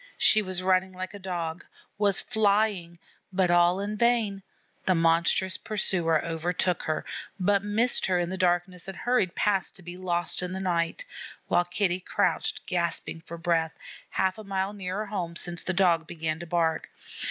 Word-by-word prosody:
She 215 - +5
was 185 -2 -3
running 185 0 +2
like 185 +1 -6
a 205 - -8
Dog, 175 -3 -4 0.4
was 200 -2 +4
flying, 205 -6 +1 0.3
but 185 -2 +2
all 175 +1 +4
in 205 +1 -3
vain; 225 -4 +2 0.5
the 185 - +4
monstrous 170 +2 +2
pursuer 175 -7 +2
overtook 175 +2 -1
her, 155 - -2 0.3
but 200 +1 +2
missed 220 +4 +3
her 185 -1 +2
in 175 0 -1
the - - -2
darkness, 180 -1 0
and 195 - -7
hurried 245 -8 +1
past 200 -2 0
to 190 - -12
be 175 +1 -8
lost 175 -2 0
in 180 0 -4
the 190 - -4
night, 175 - -1 0.4
while 175 - +3
Kitty 180 0 0
crouched 185 - -1
gasping 170 -2 -2
for 170 +1 -9
breath, 165 -1 0 0.3
half 190 +2 0
a - - -8
mile 195 0 -2
nearer 195 +1 -4
home 180 -5 -4
since 170 0 0
that 185 - -2
Dog 170 -3 +3
began 160 -1 -3
to 170 - -8
bark. 165 -1 0
185 Hz, 170 wpm, -27 LUFS, 170-195 Hz, 0.5 s, She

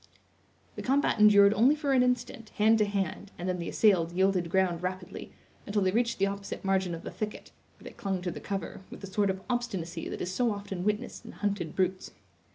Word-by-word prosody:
The - - -3
combat 270 -3 +1
endured 205 -1 +7
only 250 +7 +4
for 290 -3 0
an 255 - +5
instant, 245 -2 -1
hand 220 +1 +4
to 210 - +4
hand, 200 -1 -3
and 175 - -4
then 180 -1 -1
the 170 - -4
assailed 175 -6 +3
yielded 185 -2 +2
ground 180 -2 +1
rapidly, 185 0 -5 0.4
until 205 -1 +1
they 185 - +2
reached 235 +2 +1
the 195 - +2
opposite 200 0 -5
margin 190 -3 +1
of 165 - -10
the - - -6
thicket, 215 -1 -6 0.3
where - - -18
they - - -9
clung 190 -2 -3
to 180 - -2
the - - -7
cover, 195 -1 -5
with - - -10
the - - -6
sort 200 +1 0
of 190 0 -3
obstinacy 225 -9 -3
that - - -5
is 180 - -3
so 240 +3 +1
often 200 -3 -5
witnessed 210 +1 -2
in - - -10
hunted 200 -6 -2
brutes. 185 0 0
200 Hz, 215 wpm, -29 LUFS, 185-215 Hz, 0.4 s, endured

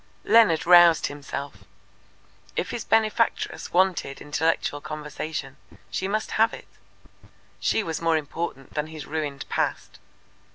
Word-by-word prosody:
Leonard 180 -7 +5
roused 175 -1 +7
himself. 145 0 -6 0.9
If - - -2
his 235 - -4
benefactress 225 +1 0
wanted 180 -6 +1
intellectual 150 -1 -1
conversation, 150 -2 -6 0.3
she 190 - -2
must 215 +2 -2
have 225 +1 +4
it. - - -13 0.9
She 220 - +1
was 165 -4 -4
more 165 -1 +3
important 145 -2 -5
than 150 0 -2
his 155 -2 -8
ruined 150 -3 -4
past. - - -2
160 Hz, 120 wpm, -25 LUFS, 145-185 Hz, 0.9 s, roused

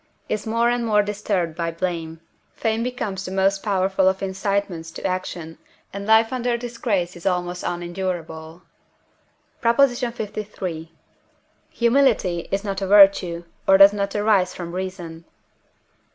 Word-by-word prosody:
is 215 0 -3
more 230 +1 +2
and 240 0 +1
more 210 -2 +3
disturbed 200 -5 -2
by 170 0 -2
blame, 165 -1 -4 0.3
fame 225 0 -1
becomes 220 -6 -3
the 185 - -6
most 195 +1 +1
powerful 190 -2 +1
of 190 +1 -3
incitements 195 -3 -2
to 165 - -9
action, 180 -3 -4 0.3
and 200 +1 -6
life 225 +2 +4
under 245 -1 0
disgrace 230 -7 -2
is 175 +2 -5
almost 180 -1 -1
unendurable. 175 -2 -5 1.0
PROP. 230 0 +2
LIII. 215 - -1 0.8
Humility 235 -8 +2
is 195 +1 -1
not 195 -2 -3
a 195 - -1
virtue, 195 -4 +5 0.2
or 195 - +7
does 195 +1 +8
not 200 0 -2
arise 205 -3 +2
from 170 -1 -6
reason. 180 -3 -6
195 Hz, 135 wpm, -22 LUFS, 175-215 Hz, 1.0 s, does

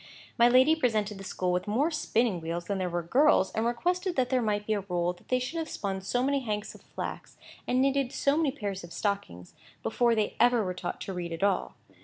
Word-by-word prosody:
My 235 0 +5
lady 260 +6 +6
presented 215 -8 0
the - - -8
school 185 -1 -2
with 180 +3 -1
more 270 +11 +1
spinning 230 - 0
wheels 170 +1 -4
than 200 0 -2
there 185 -1 -1
were 175 0 -2
girls, 250 - +4
and 220 +1 0
requested 355 +9 -1
that 255 -1 +1
there 255 -1 +3
might 210 -2 -1
be 220 - 0
a 210 - 0
rule 180 -2 -1
that 175 - -22
they 255 - +2
should 255 +7 -3
have 320 -1 -4
spun 195 -2 -3
so 245 +6 0
many 280 +1 +2
hanks 215 -4 -4
of - - -15
flax, - - -7 0.3
and 255 +1 +2
knitted 275 -1 +1
so 280 +1 +1
many 315 -2 +2
pairs 200 -8 -5
of 170 - -10
stockings, 145 - -3 0.3
before 240 -1 +2
they 215 -2 0
ever 240 -1 +4
were 185 - -2
taught 180 -1 -5
to 195 - -4
read 175 -2 -4
at 165 +3 -4
all. 200 -2 +1
215 Hz, 235 wpm, -29 LUFS, 190-255 Hz, 0.3 s, lady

